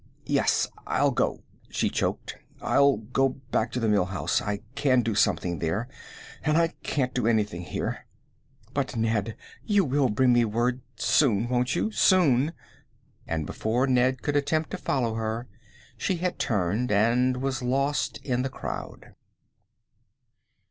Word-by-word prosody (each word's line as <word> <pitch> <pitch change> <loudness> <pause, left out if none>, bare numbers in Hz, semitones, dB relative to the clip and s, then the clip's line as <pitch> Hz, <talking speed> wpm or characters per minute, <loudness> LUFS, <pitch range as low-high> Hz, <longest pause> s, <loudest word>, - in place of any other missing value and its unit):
"Yes, - - +2 0.2
I'll - - +2
go," - - -1 0.3
she - - 0
choked. - - -2 0.2
"I'll 140 -2 +3
go 125 +5 0 0.2
back - - +1
to 125 - -1
the 115 - 0
Mill 105 -4 +3
House. 95 -1 -1
I 100 0 -3
can 130 -3 +2
do 115 0 -1
something 90 -5 +1
there, 95 +9 -1 0.6
and 155 0 +2
I 165 0 +3
can't 130 -3 -1
do 125 -3 0
anything 105 -6 +1
here. 85 - -4 0.7
But, - - -2
Ned, 110 -1 0 0.3
you 205 -4 +2
will 135 -1 +2
bring 125 +4 +3
me 120 0 +4
word 120 +3 0
soon; 115 -3 +2
won't 125 +2 +1
you? 215 - 0
soon!" 160 - +3 0.7
And 80 -2 -2
before 115 - 0
Ned 130 0 +2
could 145 - -1
attempt 155 +2 0
to - - -3
follow 120 -4 0
her, 110 +2 -3 0.5
she 190 - 0
had 180 +1 -2
turned 105 +3 0
and 120 +5 +3
was 135 0 -2
lost 140 +3 0
in 125 -2 0
the 135 - -2
crowd. - - -7
125 Hz, 150 wpm, -26 LUFS, 110-135 Hz, 0.7 s, me